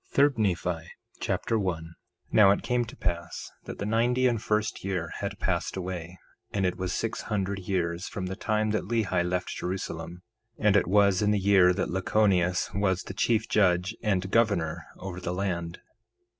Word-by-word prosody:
3 140 +1 +5
Nephi 90 -5 0 0.4
Chapter 115 - 0
1 90 -5 -1
1:1 80 - -10 0.4
Now 105 -3 +7
it 100 - +2
came 125 -1 +1
to 115 - -11
pass 90 -3 -3
that - - -7
the 100 - -3
ninety 120 +4 +2
and 120 -3 +2
first 105 -1 -1
year 90 -4 -2
had 100 0 -4
passed 90 -2 -1
away 90 -1 -5 0.3
and 100 -2 0
it 90 -1 0
was 95 0 -3
six 115 - -2
hundred 100 -2 -2
years 90 -2 -2
from 95 - -4
the 95 +1 -4
time 110 0 0
that 110 - -1
Lehi 100 -7 +1
left 90 +1 -1
Jerusalem; 90 -1 -5 0.3
and 105 -2 +3
it 100 - +4
was 100 0 +4
in 105 - +3
the 105 - +3
year 95 -2 +5
that 90 - -2
Lachoneus 95 -2 +2
was 95 -2 +1
the - - -7
chief 110 +2 +1
judge 95 0 +2
and 100 -5 +1
the - - -5
governor 100 -7 +1
over 90 -1 -6
the 90 0 -3
land. 85 -3 -2
95 Hz, 185 wpm, -28 LUFS, 90-105 Hz, 0.4 s, Now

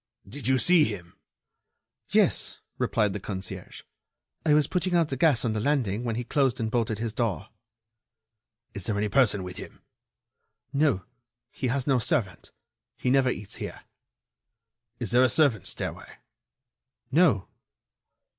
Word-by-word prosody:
"Did 125 +3 -6
you 130 0 +4
see 175 +3 +5
him?" 90 -5 -6 0.9
"Yes," - - +2 0.2
replied 105 -3 +1
the 105 - -4
concierge, 95 -1 -6 0.6
"I 155 -2 +4
was 150 -1 +4
putting 180 +3 -1
out 165 -3 +3
the 135 - -1
gas 135 -4 +3
on 115 - 0
the 110 - -1
landing 120 -4 0
when 115 -2 -2
he 120 - -2
closed 130 0 +1
and 110 -1 -2
bolted 115 -3 0
his 115 0 -3
door." 110 -4 -2 1.2
"Is 100 -4 -4
there 105 - 0
any 105 +1 0
person 105 -5 +3
with 90 0 -7
him?" - - -10 0.9
"No; 140 -10 +2 0.5
he 130 - -3
has 130 +1 -1
no 135 -3 +3
servant. 105 -4 -1 0.5
He 125 - 0
never 135 -1 +4
eats 105 -5 -4
here." - - -7 1.2
"Is 115 -4 -3
there 120 +1 +5
a 130 - +4
servants' 130 - +2
stairway?" - - -5 1.0
"No." 140 - +3
120 Hz, 145 wpm, -27 LUFS, 105-140 Hz, 1.2 s, see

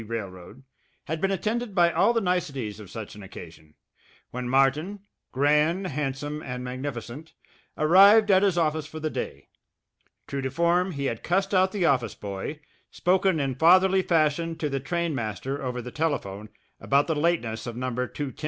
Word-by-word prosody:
Railroad, 105 +1 -7 0.4
had 160 +1 -4
been 195 - +2
attended 215 +3 -2
by 170 -2 +4
all 235 - +3
the 230 -1 +1
niceties 140 - -2
of 105 -3 -11
such 110 0 -7
an 105 - -11
occasion, 80 -5 -12 0.6
when 125 0 -4
Martin, 145 +10 +1 0.3
grand, 150 +7 +2
handsome, 145 -1 -3
and 125 -2 -6
magnificent, 130 +3 -6 0.4
arrived 200 +7 +6
at 190 0 +5
his 195 -3 +2
office 155 -2 0
for 155 - -8
the 155 0 -3
day. 70 - -5 0.8
True 140 -1 -3
to 130 - -2
form, 170 +6 +1
he 140 -1 -3
had 115 -4 -2
cussed 195 +3 0
out 190 0 +3
the 190 -4 0
office 125 -8 +1
boy, 100 +9 -6 0.3
spoken 185 -1 +1
in 135 -2 -1
fatherly 185 +6 +5
fashion 165 -1 +1
to 150 - -2
the 135 0 -2
trainmaster 135 - -3
over 125 -2 -3
the 125 - -7
telephone 110 -10 -3 0.3
about 140 +1 +2
the 165 - 0
lateness 145 -9 -1
of 120 -1 -6
No. 130 -1 -3
150 Hz, 160 wpm, -26 LUFS, 125-175 Hz, 0.8 s, arrived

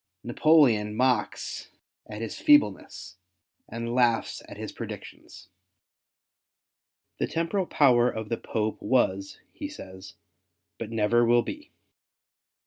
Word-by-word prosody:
Napoleon 120 -6 +3
mocks 125 -2 -1 0.4
at 105 +1 -7
his 115 - -6
feebleness, 295 -1 +2 0.5
and 115 0 -4
laughs 120 -2 +1
at - - -10
his - - -6
predictions. - - -10 1.7
The - - 0
temporal 170 +3 -1
power 125 -4 +4
of 110 -2 -6
the 115 - -1
Popes 110 -1 -3
was, 100 -6 0
he 295 - -6
says, 95 - -11 0.6
but 115 - -5
never 115 +1 +2
will 120 0 +4
be. 300 +1 -8
120 Hz, 110 wpm, -26 LUFS, 110-135 Hz, 1.7 s, power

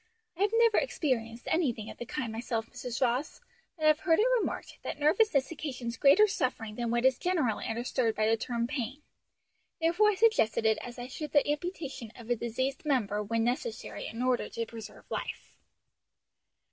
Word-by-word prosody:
I 355 - -7
have 410 - +4
never 460 -2 +5
experienced 240 - -2
anything 245 -10 0
of - - -14
the 240 - -6
kind 240 -4 -3
myself, 225 0 -2
Mrs. 245 0 -3
Ross, 255 +4 0 0.4
but 310 - -2
have 310 0 +5
heard 325 -1 +3
it 435 - +4
remarked - - -4
that - - -5
nervousness 300 -1 +3
occasions 255 -7 -4
greater 285 - +6
suffering 255 - -2
than 235 +1 -2
what 240 +2 +1
is 260 -1 +4
generally 315 - 0
understood 235 0 0
by 215 - +1
the 225 - +4
term 235 +1 -2
pain; 265 +2 -4 0.8
therefore 345 +6 +4
I 420 - +1
suggested 380 - +3
it 220 -1 +3
as 245 0 -8
I 245 - -5
should 295 +4 -6
the 290 -1 +4
amputation 295 - -3
of 235 -1 -8
a - - +4
diseased 240 +4 -2
member 225 -9 +1
when 225 +2 0
necessary 255 - -3
in 230 +2 -4
order 255 -1 +1
to 230 - -3
preserve 225 -1 -10
life." - - -5
255 Hz, 180 wpm, -30 LUFS, 230-310 Hz, 0.8 s, greater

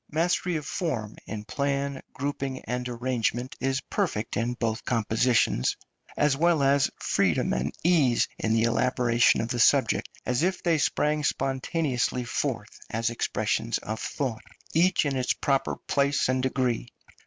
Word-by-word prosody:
Mastery 175 +2 0
of 150 -2 -3
form 125 - -3
in 105 0 -6
plan, 140 0 -2
grouping, 135 -1 -3
and 125 +1 -3
arrangement 120 0 -2
is 135 +1 0
perfect 165 - -2
in 120 +2 -1
both 115 0 -2
compositions, 115 - +1 0.4
as 145 -2 +3
well 165 0 +3
as 140 0 +3
freedom - - +1
and 65 +3 -1
ease 150 -9 +3
in 110 - +1
the 115 - +3
elaboration 120 0 +3
of 115 - -3
the 120 -1 -2
subjects, - - +3 0.2
as 125 +2 0
if 185 +2 0
they 165 -3 +2
sprang 150 +1 +1
spontaneously 135 -2 0
forth 115 - -3
as 115 +1 -1
expressions 110 0 -1
of 110 +1 -5
thought, 120 -5 -3 0.3
each 175 +1 +3
in 140 -1 0
its 130 -1 +1
proper 135 -1 0
place 140 0 +1
and 130 0 +1
degree. 130 -2 0
130 Hz, 145 wpm, -27 LUFS, 115-145 Hz, 0.4 s, as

